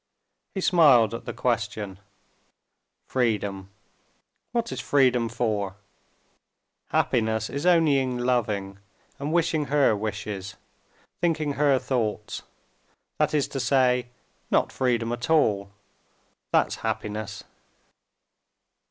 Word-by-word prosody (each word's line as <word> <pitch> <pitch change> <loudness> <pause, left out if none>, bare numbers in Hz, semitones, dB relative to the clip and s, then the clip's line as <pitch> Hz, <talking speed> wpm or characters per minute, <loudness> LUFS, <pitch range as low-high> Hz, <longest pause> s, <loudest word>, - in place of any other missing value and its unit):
He 190 - -2
smiled 135 - +5
at 115 - -6
the - - -4 0.2
question. 105 -4 -1 1.1
"Freedom! 100 -6 -1 0.8
What 235 -1 -1
is - - -4
freedom 125 -4 +3
for? 105 -4 -1 1.1
Happiness 110 -1 +1
is 140 +5 -2
only 165 -5 +5
in 130 -2 -1
loving 105 -6 -1 0.4
and 145 +2 -3
wishing 165 -2 +1
her 140 -6 +3
wishes, 100 -2 -5 0.7
thinking 155 -4 +1
her 140 -1 +3
thoughts, 110 -5 -2 0.8
that - - +2
is 145 - +2
to 135 - -4
say, 125 -1 +2 0.4
not - - +2
freedom 120 -3 0
at 120 +6 -4
all—that's 105 -9 -1
happiness!" 105 -1 -4
120 Hz, 100 wpm, -25 LUFS, 105-140 Hz, 1.1 s, smiled